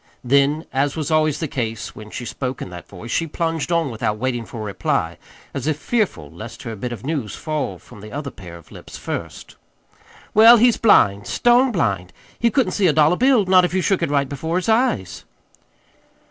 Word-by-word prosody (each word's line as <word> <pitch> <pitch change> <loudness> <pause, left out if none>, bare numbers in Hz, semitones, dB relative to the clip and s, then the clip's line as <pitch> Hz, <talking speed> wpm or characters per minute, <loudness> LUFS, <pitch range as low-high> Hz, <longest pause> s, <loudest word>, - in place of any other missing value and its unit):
Then, 140 +5 +2
as 140 +1 0
was 155 -1 -3
always 155 -2 +2
the 160 - -2
case 115 -6 -4
when 110 0 -10
she 120 +2 -6
spoke 130 +1 -4
in 90 - -7
that 90 -1 -10
voice, 105 +5 -9
she 165 - 0
plunged 165 +1 -2
on 165 -5 +1
without 105 -1 -2
waiting 120 0 -2
for 115 - -9
a - - -4
reply, 95 -4 -2 0.3
as 140 0 -4
if 155 -2 0
fearful 190 - -2
lest 110 +10 -10
her 115 -3 -5
bit 120 +4 -5
of 120 0 -7
news 140 -9 -3
fall 150 - -3
from 100 - -15
the 105 +1 -10
other 140 0 -5
pair 90 -4 -11
of 85 - -18
lips - - -11
first. - - -7 0.8
"Well, 225 +3 +8
he's 240 +1 +4
blind 100 - +4
stone 245 +2 +3
blind. 100 - -1 0.3
He 235 - +3
couldn't 250 +3 +1
see 200 -3 +2
a 155 - +3
dollar 155 +3 +4
bill 250 -2 +3
not 185 0 +5
if 180 0 -1
you 185 - +2
shook 195 0 +1
it - - 0
right 140 -1 +1
before 160 +5 -4
his 180 +3 -1
eyes." 220 - 0
140 Hz, 205 wpm, -21 LUFS, 110-175 Hz, 0.8 s, Well